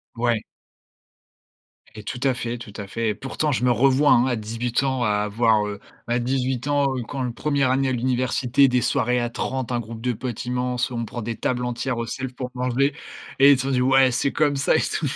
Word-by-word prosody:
Ouais. 115 -2 0 1.5
Et 105 - -9
tout 120 +4 -5
à 135 - +3
fait, 120 0 -4
tout 110 -4 -11
à 100 -2 -6
fait. 115 +2 -2
Et 105 - -1
pourtant, 145 +5 -2
je 125 - -1
me 125 - +4
revois, 135 +4 +4
hein, 120 - +5
à 130 -2 0
18 115 +3 -2
ans, 130 -2 0
à 105 - +2
avoir, 105 0 +2
heu 100 -1 -6 0.3
bah, 120 - 0
à - - +1
18 130 +1 -1
ans, 145 -1 +2
heu, 125 - -3
quand 135 +4 -5
le 125 -2 -1
1re 140 0 0
année 135 +1 +1
à - - 0
l'université, 125 +1 +2
des 125 -1 +1
soirées 125 +3 +1
à 120 0 -1
30 130 +1 -3
un 120 - 0
groupe 115 0 -8
de 125 0 0
potes 120 +1 -5
immense, 125 0 -1
on 115 -1 -3
prend 120 +2 -6
des 115 +1 -4
tables 125 +3 -2
entières 125 +1 -2
au 115 - -2
self 130 +2 -5
pour 125 0 -5
manger 125 +3 +1 0.4
et 140 +1 +7
ils 140 - +5
t'ont 135 - -2
dit: 125 -1 +2
«Ouais, 135 0 +4
c'est 130 +3 0
comme 145 -1 +1
ça, 135 +2 +2
et - - +4
tout» 155 - -1
125 Hz, 235 wpm, -23 LUFS, 115-130 Hz, 1.5 s, et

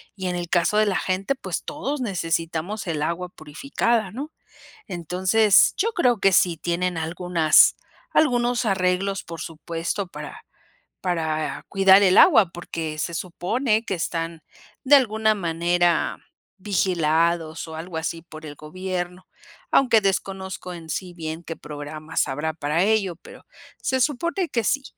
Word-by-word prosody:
y 190 -2 -4
en 180 - -2
el 175 -1 -4
caso 175 +4 +2
de 215 - +4
la 190 - +1
gente, 190 +7 -1
pues, 185 -8 -5
todos 290 -1 -4
necesitamos 170 -1 -2
el 155 -3 -2
agua 175 +3 -2
purificada, 215 - -2
¿no? 280 +7 -6 0.6
Entonces, 185 +4 +3
yo 455 - +1
creo 250 - +2
que 195 - +5
sí 175 -1 +3
tienen 175 +2 -2
algunas 165 -1 +4 0.4
algunos 245 -4 +2
arreglos, 195 0 0
por 165 -1 -8
supuesto, 165 +4 -4
para - - -9 0.6
para 160 -4 -2
cuidar 195 0 +6
el 185 0 +4
agua, 220 - +7
porque 165 -2 -5
se 170 +3 -2
supone 215 +7 -1
que 195 - -2
están 165 -1 -3 0.4
de 285 - +6
alguna 220 -4 +2
manera 175 -1 +1 0.4
vigilados 170 -4 0
o 160 - -8
algo 165 +1 -7
así 165 0 -4
por 160 -2 -11
el 145 - -8
gobierno, 180 +3 -5 0.5
aunque 250 -5 +5
desconozco 190 -2 -3
en 165 -1 -10
sí 180 +1 -4
bien 160 -1 -6
qué 165 - -6
programas 150 +1 -4
habrá 150 +4 -2
para 155 +3 0
ello, 205 -5 +1
pero - - -15 0.4
se 260 0 0
supone 335 +7 0
que 235 - -1
sí, 275 +6 0
180 Hz, 145 wpm, -23 LUFS, 165-210 Hz, 0.6 s, agua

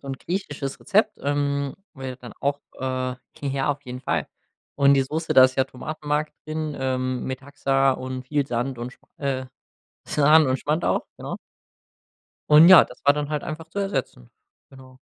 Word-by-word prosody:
So 140 - -10
'n 135 - -2
griechisches 145 -5 -4
Rezept, 215 +1 +2
ähm, 140 -1 -1 0.2
wäre 130 -3 -7
dann 120 -2 -11
auch, 140 +1 0 0.2
äh 130 -1 -2 0.3
Ja, 140 0 0
auf 145 0 -4
jeden 125 0 -7
Fall. - - -1 0.5
Und 140 -1 +5
die 135 - +3
Soße, 160 +5 -3
da 130 - +9
ist 130 0 +1
ja 130 - +3
Tomatenmark 150 +3 -3
drin, 155 -1 -3
ähm, 130 -1 -1
Metaxa 135 0 0
und 130 0 -5
viel 145 0 0
Sand 120 0 -2
und 120 +2 -6
Sch - - -32 0.2
äh, 135 -2 -2 0.6
Sahne 150 0 +5
und 130 - +1
Schmand 155 +5 -1
auch. - - +1
Genau. - - -6 1.1
Und, 155 +3 +9
ja, 185 -2 +10
das 125 - -14
war 145 - +7
dann 145 0 -3
halt 150 -1 -2
einfach 160 +1 -6
zu 185 - -6
ersetzen, 135 - -3 0.4
genau. 130 -1 -15
140 Hz, 175 wpm, -24 LUFS, 130-150 Hz, 1.1 s, ja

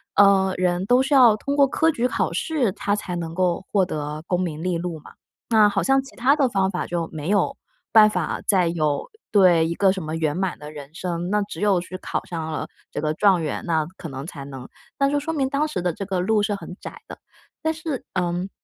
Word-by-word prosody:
呃， 195 -2 +5
人 180 0 0
都 250 +1 +5
是 265 +2 0
要 240 -5 +7
通 280 +5 -2
过 280 -1 +6
科 320 +4 +2
举 250 -6 0
考 190 -6 -1
试， 250 - 0
他 205 - -1
才 180 -3 -4
能 165 -1 -4
够 180 +1 0
获 195 -3 +3
得 150 -2 -4
功 180 0 0
名 160 -3 -3
利 180 -1 -1
禄 170 -2 -4
嘛。 - - -15 0.4
那 215 -2 +6
好 200 -1 0
像 270 0 +3
其 270 - -15
它 265 +4 +4
的 275 -5 +2
方 195 -3 +1
法 180 - -3
就 170 -2 -3
没 155 +3 -4
有 205 - +2 0.4
办 215 -1 +8
法 - - -2
再 185 -4 +3
有 155 -4 -1 0.2
对， 180 -5 +5
一 170 - -2
个 195 -2 +4
什 190 -3 -4
么 155 +1 -4
圆 155 -2 0
满 190 -1 -1
的 150 0 -9
人 145 0 -10
生， 175 0 -3
那 210 0 +2
只 205 - -8
有 200 -4 +3
去 185 +1 -7
考 - - -4
上 160 -2 -5
了 - - -3 0.2
这 - - -4
个 155 0 0
状 190 -4 +4
元， 150 - -3
那 160 -3 +1
可 165 - -7
能 135 +1 -6
才 140 -6 -8
能 135 -2 -9 0.3
那 275 0 +3
就 290 0 +1
说 325 +3 -3
明 275 -3 0
当 295 +2 0
时 300 - -3
的 175 -1 0
这 195 - -5
个 190 -2 -2
路 210 +3 +2
是 210 - 0
很 180 -2 -9
窄 - - -9
的。 - - -9 0.5
但 320 - +2
是， 315 -4 -5
嗯， 180 +1 -1
185 Hz, 260 characters per minute, -23 LUFS, 165-215 Hz, 0.5 s, 办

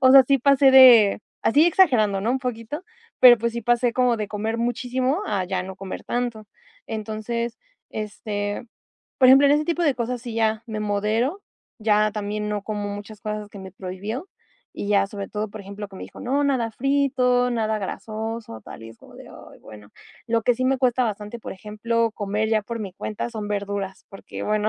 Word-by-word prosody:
o 260 -1 +6
sea, 270 -1 +9
sí 275 - +4
pasé 275 +1 +5
de 240 -7 +8 0.2
así, 295 +8 +4
exagerando, 240 - +3
no 220 +5 0
un 265 - 0
poquito, 250 +7 -5 0.4
pero, 245 -2 +9
pues, 235 +1 -1
sí 235 - -2
pasé 240 +1 +2
como 250 -2 +2
de 210 -2 -4
comer 220 +2 -3
muchísimo 255 - -1
a 195 -3 -1
ya 185 0 -2
no 190 0 -8
comer 190 -1 -7
tanto. 240 -3 -3 0.4
Entonces, 225 +2 -4 0.3
este, 205 +1 -4 0.5
por 255 -2 +6
ejemplo, 270 +2 +8
en 280 - +5
ese 300 +1 +1
tipo 340 +1 -1
de 295 -5 +3
cosas, 245 0 -3
sí, 235 -3 -6
ya 220 -1 +1
me 215 -2 -5
modero, 215 - -1 0.4
ya 215 -1 +2
también 210 0 -3
no 205 -1 -2
como 205 -1 -4
muchas 205 +1 -10
cosas 210 -1 -5
que 200 - -12
me 190 -1 -10
prohibió 200 - -6 0.5
y 200 - -5
ya 200 -1 +3
sobre 200 -1 -7
todo, 210 0 -3
por 215 0 -8
ejemplo, 200 +1 -8
que 195 - -12
me - - -8
dijo: - - -13
"No, 275 +3 0
nada 255 -5 0
frito, 255 -2 +1
nada 220 -2 0
grasoso", 215 - -5
tal - - -11
y 115 - -9
es 115 - -17
como - - -17
de: - - -12
"Ay, - - -14
bueno". 105 -1 -13 0.4
Lo 230 -1 +1
que 245 - +3
sí 255 +2 -2
me 265 0 +2
cuesta 255 -1 +2
bastante, 210 +1 -4
por - - -7
ejemplo, 225 +3 -1
comer 210 +1 -2
ya 220 -2 +2
por 230 +2 -6
mi 195 -3 -6
cuenta 215 +4 -4
son 215 -2 -5
verduras 200 -2 -4
porque, 195 - -9
bueno, 215 0 +1
220 Hz, 200 wpm, -23 LUFS, 205-250 Hz, 0.5 s, sea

